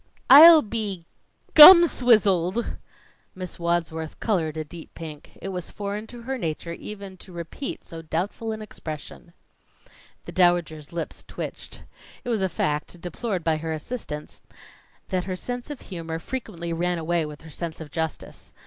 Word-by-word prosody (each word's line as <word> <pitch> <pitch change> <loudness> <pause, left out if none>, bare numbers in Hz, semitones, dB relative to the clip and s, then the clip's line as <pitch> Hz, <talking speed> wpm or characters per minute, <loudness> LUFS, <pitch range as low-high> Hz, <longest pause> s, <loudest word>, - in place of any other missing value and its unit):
"I'll 315 +3 +11
be 205 -6 -4 0.5
gum 340 +3 +12
swizzled!" 215 - +2 0.6
Miss 185 -1 -7
Wadsworth 165 -2 -2
colored 165 -8 -1
a 155 - -2
deep 160 +2 -12
pink. 155 -3 -10
It 195 - -6
was 180 -2 -5
foreign 205 +1 -5
to 240 0 -11
her 265 +2 -3
nature 170 -1 -4
even 200 +1 -9
to 185 - -13
repeat 170 - -6
so 165 -1 -8
doubtful 185 +8 -3
an 215 0 -5
expression. 160 -3 -9 0.9
The - - -7
Dowager's 175 -4 +1
lips 170 -1 -5
twitched. - - -7 0.4
It - - -5
was 225 -4 0
a 190 - +1
fact, 150 +1 -2
deplored 180 +2 -4
by 160 -1 +1
her 160 +1 -4
assistants, 155 -3 -6 0.7
that 185 -1 -1
her 185 -1 -3
sense 245 +7 -5
of 290 -3 -7
humor 165 -3 -6
frequently 170 -5 -5
ran 175 +1 -1
away 165 +1 0
with 150 -1 -10
her 160 0 -13
sense 165 +1 -5
of 155 -3 -9
justice. 160 -1 -5
175 Hz, 155 wpm, -25 LUFS, 160-215 Hz, 0.9 s, gum